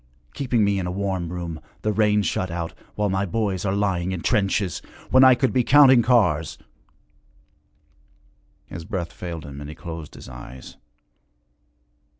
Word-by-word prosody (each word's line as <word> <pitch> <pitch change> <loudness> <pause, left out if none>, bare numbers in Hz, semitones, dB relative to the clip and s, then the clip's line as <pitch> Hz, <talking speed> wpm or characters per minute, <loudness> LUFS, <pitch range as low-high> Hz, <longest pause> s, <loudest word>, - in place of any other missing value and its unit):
Keeping 125 -5 0
me 100 -1 +1
in 90 - -3
a - - -2
warm 95 -3 -2
room, 85 -3 -5 0.2
the 105 - +1
rain 105 0 +3
shut 95 -1 -1
out, 85 -1 -4 0.2
while 105 0 0
my 95 +1 0
boys 100 -1 -2
are 95 0 0
lying 95 -3 0
in 90 -3 -4
trenches! 100 -3 0 0.3
When 130 0 +7
I 130 -1 +8
could 130 +1 0
be 125 -1 +3
counting 130 -1 +7
cars 95 - +2 1.1
' - - -38
His 85 - -6
breath 85 0 -4
failed 85 -4 -7
him 70 0 -9
and 75 - -7
he 75 - -8
closed 80 -2 -8
his - - -11
eyes. 65 0 -11
95 Hz, 160 wpm, -23 LUFS, 80-105 Hz, 1.1 s, I